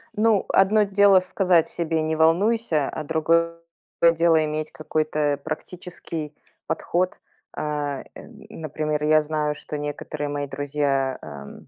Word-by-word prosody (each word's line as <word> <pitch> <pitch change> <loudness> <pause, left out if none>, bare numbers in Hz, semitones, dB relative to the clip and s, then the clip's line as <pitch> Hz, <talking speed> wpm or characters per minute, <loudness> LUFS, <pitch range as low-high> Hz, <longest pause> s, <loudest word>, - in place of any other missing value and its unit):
Ну, 215 -2 +3
одно 210 +3 +4
дело 200 -1 +5
сказать 185 -2 +2
себе: 165 -1 -1
"Не 155 0 -1
волнуйся", 165 0 +2
а 155 - -5
другое 165 +2 +1 0.6
дело 165 -1 +3
иметь 155 0 -3
какой-то 155 -2 -1
практический 160 -1 -6 0.3
подход. 175 +3 -1 0.4
А, 145 -2 -3
эм, - - -13
например, 155 -1 -3
я 155 0 +5
знаю, 150 -1 -1
что 150 - -6
некоторые 145 0 -4
мои 145 0 -3
друзья, 135 -1 -1
ам 70 -1 -10
155 Hz, 125 wpm, -24 LUFS, 150-170 Hz, 0.6 s, дело